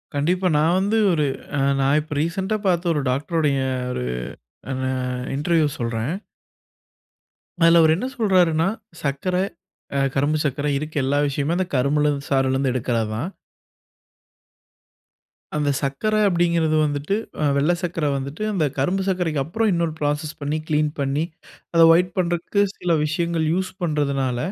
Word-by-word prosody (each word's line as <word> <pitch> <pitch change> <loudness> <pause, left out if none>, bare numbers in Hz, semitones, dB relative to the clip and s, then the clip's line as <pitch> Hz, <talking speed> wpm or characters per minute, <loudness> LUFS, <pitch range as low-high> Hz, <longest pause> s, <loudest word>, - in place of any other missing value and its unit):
கண்டிப்பா. 180 +6 +1
நா 150 - +3 0.2
வந்து 205 +3 +1
ஒரு 155 -3 +2 0.3
ஆ - - +1 0.2
நா 135 - +2
இப்ப 150 -1 -7
ரீசென்ட்டா 190 +6 -1
பாத்த 175 -1 +1
ஒரு 145 - 0
டாக்ட்ருடைய 145 +1 0 0.3
ஒரு 60 - -3 0.8
ந - - -1 0.5
இன்டர்வியூ 160 +1 +2
சொல்றேன். 115 +6 -2 1.5
அதுல 165 0 +7
அவர் 160 0 +5
என்ன 215 - -3
சொல்றாருனா 180 -6 +3 0.3
சக்கர, 145 +6 -1 0.6
அ - - +2 0.2
கரும்பு 145 +3 +2
சக்கர 140 +1 -1
இருக்க 155 +2 -6
எல்லா 140 +2 +1
விஷயமே 145 +4 -1
அந்த 185 -1 0
கரும்புல 145 +3 +2
இருந்து 140 -1 -3
சாறுல 135 -1 +2
இருந்து 135 -1 +1
எடுக்குறதுதான். 115 - -1 2.3
அந்த 145 -1 +1
சக்கர 140 +11 -1
அப்டிங்கிறது 170 -3 +2
வந்துட்டு 145 +6 -1 0.3
அ - - +1
வெள்ள 150 +5 +3
சக்கர 165 -3 -2
வந்துட்டு, 140 +9 -5
அந்த 165 -6 +1
கரும்பு 185 +8 +1
சக்கரைக்கு 165 -6 0
அப்பறம் 215 +7 0
இன்னொரு 170 -2 0
ஃப்ராசஸ் 150 +1 -1
பண்ணி 145 +2 -1
க்ளீன் 150 -1 +1
பண்ணி, 140 +3 0 0.5
அத 165 - +5
வொய்ட் 180 +2 +3
பண்றக்கு 175 +3 0 0.2
சில 175 - -1
விஷயங்கள் 165 0 -1
யூஸ் 185 +1 -1
பண்றதுனால, 140 -5 0
155 Hz, 135 wpm, -22 LUFS, 140-175 Hz, 2.3 s, அதுல